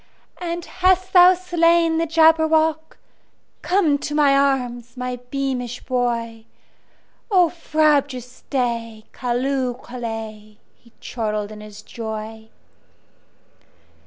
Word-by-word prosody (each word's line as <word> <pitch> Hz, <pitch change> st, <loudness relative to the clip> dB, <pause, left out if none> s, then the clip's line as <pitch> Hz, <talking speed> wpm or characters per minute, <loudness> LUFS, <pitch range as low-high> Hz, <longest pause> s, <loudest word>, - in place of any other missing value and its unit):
"And 345 Hz, -1 st, -4 dB
hast 370 Hz, 0 st, +1 dB
thou 365 Hz, 0 st, +8 dB
slain 335 Hz, -2 st, +2 dB
the 330 Hz, -, 0 dB
Jabberwock? 320 Hz, 0 st, +3 dB, 0.6 s
Come 350 Hz, -6 st, +2 dB
to 295 Hz, -, -4 dB
my 285 Hz, -2 st, +4 dB
arms, 250 Hz, -4 st, -1 dB
my 250 Hz, 0 st, -4 dB
beamish 255 Hz, -3 st, -3 dB
boy!O 240 Hz, -, -3 dB
frabjous 285 Hz, -7 st, 0 dB
day! 230 Hz, -4 st, -2 dB
Callooh! 255 Hz, +1 st, -1 dB
Callay!"He 225 Hz, -2 st, -9 dB
chortled 215 Hz, -3 st, -3 dB
in 210 Hz, 0 st, -10 dB
his 210 Hz, 0 st, -12 dB
joy. 220 Hz, 0 st, -7 dB
255 Hz, 90 wpm, -21 LUFS, 230-320 Hz, 0.6 s, thou